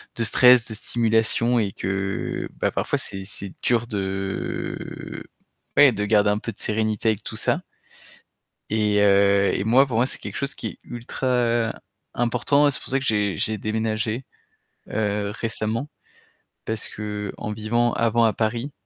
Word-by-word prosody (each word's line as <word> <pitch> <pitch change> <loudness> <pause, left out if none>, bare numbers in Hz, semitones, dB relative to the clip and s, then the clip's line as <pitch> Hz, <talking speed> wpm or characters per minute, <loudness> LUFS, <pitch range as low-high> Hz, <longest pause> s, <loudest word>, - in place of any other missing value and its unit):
de 115 - 0
stress, 125 +2 +6
de 110 - -4
stimulation 115 +1 +2
et 100 -4 -1
que 95 +1 -3 0.3
parfois, - - 0
c'est 95 0 -5
c'est 95 0 -5
dur 120 -1 +1
de, 95 -2 -4 0.5
ouais, 145 -2 +8
de 105 -2 -2
garder 105 -1 +3
un 105 - +2
peu 115 - -5
de - - -18
sérénité 110 +1 0
avec 110 - -1
tout - - -6
ça. - - +1 1.1
Et, 105 -1 +2
heu, 100 0 +4
et 95 - -1
moi, 125 +5 +5
pour 125 -4 -3
moi, 120 +2 +3
c'est - - -3
quelque - - -7
chose 140 0 -2
qui - - -6
est - - -11
ultra 120 -1 -1 0.4
important. 125 +5 +2
C'est 135 - -2
pour - - -9
ça 135 - +2
que 135 - -5
j'ai 105 -4 +1
j'ai 110 +7 0
déménagé. 110 +3 -2 0.7
Heu, 105 -1 -1
récemment, 115 +4 -3 0.8
parce 110 -1 -3
qu'en 105 0 -5
vivant 115 +3 0
avant 115 0 +2
à 110 - +4
Paris, 115 +6 -2
110 Hz, 155 wpm, -23 LUFS, 105-120 Hz, 1.1 s, ouais